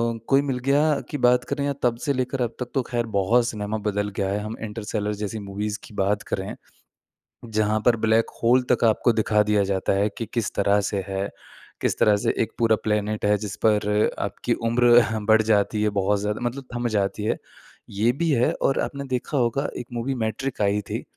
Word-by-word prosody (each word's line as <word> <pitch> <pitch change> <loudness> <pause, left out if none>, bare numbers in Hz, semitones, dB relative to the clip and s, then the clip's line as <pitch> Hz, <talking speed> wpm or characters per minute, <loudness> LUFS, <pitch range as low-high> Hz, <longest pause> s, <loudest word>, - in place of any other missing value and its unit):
अ, - - -6
कोई 135 0 +4
मिल 135 -3 -2
गया 145 +1 +3
की 145 - -3
बात 125 -1 +4
करें 140 0 -1
या 140 - 0
तब 120 -1 +2
से 140 - +2
लेकर 130 0 -2
अब 115 - -4
तक 125 -1 -5
तो 135 - +2
ख़ैर 120 -1 -1
बहुत 115 +5 +3
सिनेमा 105 -1 -3
बदल 105 0 -1
गया 100 -2 -1
है। 100 +1 -1
हम 110 +2 -5
इंटरस्टेलर 105 -1 -3
जैसी 105 +1 -3
मूवीज़ 105 +1 -4
की - - -13
बात 100 +1 +1
करें, 95 +1 -3 0.9
जहाँ 110 -1 0
पर 120 - +5
ब्लैक 110 +1 +3
होल 125 +2 +4
तक 120 - +2
आपको 115 +2 +2
दिखा 105 -1 +2
दिया 105 -1 +2
जाता 95 0 0
है 100 +2 +2
कि 115 - -3
किस 115 -4 -1
तरह 100 0 +3
से 100 -2 -2
है, 95 0 -2 0.5
किस - - 0
तरह 105 -1 +5
से - - +2
एक - - -6
पूरा 115 -1 +4
प्लेनेट 105 0 -1
है 105 0 +3
जिस 105 -2 -5
पर 105 0 +3
आपकी - - -2 0.2
उम्र 120 0 +5 0.2
बढ़ 110 0 +6
जाती 105 +1 +2
है 105 - +3
बहुत 100 +2 +1
ज़्यादा 105 +2 -2
मतलब 135 +3 -8
थम 120 0 -1
जाती 100 +1 -1
है। 110 - 0 0.5
ये 105 +4 +2
भी 170 -1 +1
है 125 -2 +3
और 135 - +2
आपने 140 -1 -4
देखा 130 +3 -2
होगा 125 +3 +1
एक 120 - -6
मूवी 120 +3 -2
मैट्रिक्स 115 +4 -3
आई 100 0 +2
थी, - - -3
110 Hz, 210 wpm, -24 LUFS, 105-120 Hz, 0.9 s, बढ़